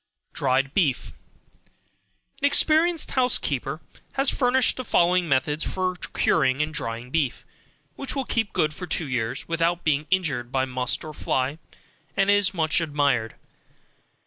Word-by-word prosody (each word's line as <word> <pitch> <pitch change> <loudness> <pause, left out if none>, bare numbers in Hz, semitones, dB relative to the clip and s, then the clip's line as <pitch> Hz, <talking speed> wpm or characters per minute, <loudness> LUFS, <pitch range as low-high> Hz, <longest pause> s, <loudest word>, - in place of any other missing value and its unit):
Dried 135 0 +1
Beef. 150 -10 0 1.3
An 285 - 0
experienced 320 +3 +3
housekeeper 255 -1 0 0.3
has 270 0 +3
furnished 255 0 +2
the 255 - -3
following 180 -4 +2
method 145 +3 +1
for 185 -1 -1
curing 135 -5 +1
and 155 +1 -5
drying 115 -2 -5
beef, 145 -6 -1 0.5
which 275 - -3
will 270 -1 -2
keep 225 -3 -1
good 155 -1 0
for 180 +3 -6
two 160 - -1
years, 120 -3 -3
without 170 +1 0
being 150 -1 +1
injured 145 -10 0
by 130 0 +1
must 125 -1 -2
or 155 -1 -8
fly, 135 +1 -1 0.6
and 195 0 +3
is 205 -2 +3
much 165 -2 +1
admired. 140 -8 0
160 Hz, 140 wpm, -24 LUFS, 135-195 Hz, 1.3 s, experienced